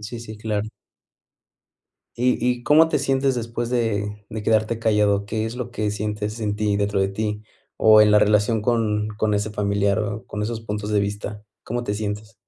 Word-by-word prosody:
Sí, 110 Hz, +3 st, -7 dB
sí, 110 Hz, -2 st, -9 dB
claro. 110 Hz, -1 st, -2 dB, 1.5 s
¿Y 125 Hz, +1 st, +2 dB
y 125 Hz, -1 st, -1 dB
cómo 155 Hz, +4 st, +5 dB
te 155 Hz, -, 0 dB
sientes 135 Hz, -1 st, +1 dB
después 115 Hz, 0 st, -3 dB
de 105 Hz, -4 st, -1 dB
de 110 Hz, -2 st, -5 dB
quedarte 110 Hz, +1 st, +1 dB
callado? 105 Hz, -3 st, +2 dB
¿Qué 110 Hz, +1 st, -2 dB
es 115 Hz, +2 st, -6 dB
lo 125 Hz, -1 st, -5 dB
que 110 Hz, -3 st, -1 dB
sientes 105 Hz, +1 st, -3 dB
en 105 Hz, -2 st, -1 dB
ti, 105 Hz, -1 st, 0 dB
dentro 100 Hz, -1 st, 0 dB
de 95 Hz, -, +2 dB
ti? 105 Hz, +1 st, -3 dB, 0.3 s
O 110 Hz, -1 st, +7 dB
en 105 Hz, 0 st, +6 dB
la 105 Hz, -, +6 dB
relación 105 Hz, +1 st, +2 dB
con 110 Hz, -3 st, +1 dB
con 105 Hz, -1 st, +1 dB
ese 105 Hz, +1 st, -1 dB
familiar, 100 Hz, 0 st, 0 dB
o 105 Hz, -1 st, -3 dB
con 105 Hz, -, -6 dB
esos 110 Hz, +1 st, -3 dB
puntos 105 Hz, -1 st, -4 dB
de 105 Hz, -1 st, +2 dB
vista, 105 Hz, +1 st, -4 dB, 0.2 s
¿cómo 120 Hz, +2 st, -3 dB
te 105 Hz, -4 st, -2 dB
sientes? 105 Hz, +1 st, -4 dB
105 Hz, 190 wpm, -23 LUFS, 105-115 Hz, 1.5 s, O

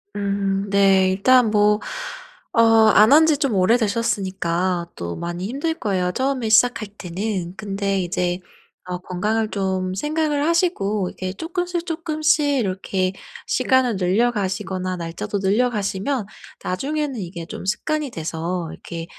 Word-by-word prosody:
음. 200 Hz, -1 st, -1 dB
네 195 Hz, -1 st, +4 dB
일단 245 Hz, +4 st, +4 dB
뭐 210 Hz, 0 st, +4 dB, 0.7 s
어 230 Hz, -, +5 dB, 0.3 s
안 215 Hz, +5 st, +7 dB
한 315 Hz, +2 st, +7 dB
지 295 Hz, -, +3 dB
좀 275 Hz, -5 st, 0 dB
오래되셨으니까 190 Hz, -4 st, 0 dB
또 85 Hz, 0 st, -5 dB
많이 175 Hz, +2 st, -4 dB
힘들 290 Hz, +7 st, -2 dB
거예요 185 Hz, -, -1 dB
처음에 260 Hz, -2 st, -1 dB
시작할 230 Hz, 0 st, +4 dB
때는. 185 Hz, 0 st, -3 dB
근데 195 Hz, -2 st, -1 dB
이제 175 Hz, 0 st, -1 dB, 0.5 s
어 180 Hz, 0 st, -3 dB
건강을 210 Hz, +5 st, -1 dB
좀 190 Hz, -2 st, -1 dB
생각을 295 Hz, +3 st, 0 dB
하시고 215 Hz, -, +1 dB
이게 185 Hz, 0 st, -5 dB
쪼끔씩 350 Hz, -, -3 dB
쪼끔씩 315 Hz, -2 st, +1 dB, 0.2 s
이렇게 190 Hz, -2 st, -1 dB, 0.3 s
시간을 255 Hz, -6 st, +2 dB
늘려가시거나 190 Hz, -2 st, 0 dB
날짜도 175 Hz, +5 st, -4 dB
늘려가시면 210 Hz, +3 st, 0 dB, 0.4 s
나중에는 275 Hz, +6 st, -2 dB
이게 170 Hz, -2 st, -6 dB
좀 -, -, -8 dB
습관이 300 Hz, +8 st, -1 dB
돼서 165 Hz, +2 st, -3 dB
이렇게 165 Hz, -1 st, -7 dB
200 Hz, 285 characters per minute, -22 LUFS, 185-250 Hz, 0.7 s, 안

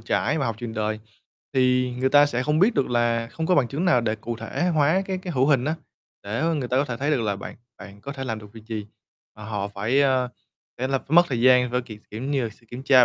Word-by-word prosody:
trải 125 Hz, +6 st, 0 dB
và 135 Hz, -, 0 dB
học 115 Hz, -2 st, -2 dB
trường 115 Hz, -1 st, -6 dB
đời, 110 Hz, 0 st, -2 dB, 0.5 s
thì 125 Hz, -1 st, +2 dB
người 130 Hz, +1 st, +2 dB
ta 145 Hz, +1 st, +6 dB
sẽ 125 Hz, -3 st, -1 dB
không 150 Hz, +3 st, +1 dB
biết 210 Hz, +7 st, +4 dB
được 135 Hz, -, +1 dB
là 120 Hz, -1 st, +1 dB
không 160 Hz, -, -3 dB
có 180 Hz, -, +3 dB
bằng 135 Hz, -7 st, +3 dB
chứng 145 Hz, +8 st, -2 dB
nào 170 Hz, -9 st, +4 dB
để 110 Hz, -2 st, 0 dB
cụ 115 Hz, +2 st, -5 dB
thể 115 Hz, +10 st, -2 dB
hóa 155 Hz, +5 st, +3 dB
cái 190 Hz, -1 st, -2 dB
cái 180 Hz, -1 st, -6 dB
hữu 130 Hz, -2 st, +2 dB
hình 135 Hz, -4 st, +3 dB
á, 155 Hz, +3 st, 0 dB, 0.5 s
để, 105 Hz, +3 st, -4 dB
ơ, 165 Hz, +1 st, +1 dB
người 135 Hz, -5 st, -2 dB
ta 125 Hz, -, 0 dB
có 135 Hz, -, +3 dB
thể 125 Hz, -5 st, -4 dB
thấy 140 Hz, +4 st, -1 dB
được 140 Hz, -6 st, +1 dB
là 100 Hz, -2 st, -1 dB
bạn 100 Hz, -, -8 dB, 0.2 s
bạn 100 Hz, 0 st, -12 dB
có 140 Hz, -, -6 dB
thể 135 Hz, -1 st, -6 dB
làm 110 Hz, -4 st, -3 dB
được 105 Hz, -1 st, -13 dB
việc 110 Hz, -2 st, -13 dB
gì, 110 Hz, -2 st, -5 dB, 0.5 s
mà 105 Hz, -, -10 dB
họ 105 Hz, -2 st, -3 dB
phải, 105 Hz, +7 st, 0 dB
ơ, 130 Hz, -2 st, +2 dB, 0.5 s
phải 130 Hz, +2 st, -1 dB
là 135 Hz, 0 st, +1 dB
phải -, -, -19 dB
mất 175 Hz, -, +10 dB
thời 125 Hz, -3 st, -1 dB
gian 125 Hz, 0 st, +5 dB
v -, -, -7 dB
kiểu 110 Hz, -4 st, -10 dB
kiểu 110 Hz, +3 st, -6 dB
như 135 Hz, 0 st, 0 dB
là, -, -, -2 dB
sự 115 Hz, +2 st, -21 dB
kiểm 125 Hz, +2 st, -7 dB
tra 130 Hz, -2 st, +6 dB
125 Hz, 285 wpm, -24 LUFS, 115-140 Hz, 0.5 s, mất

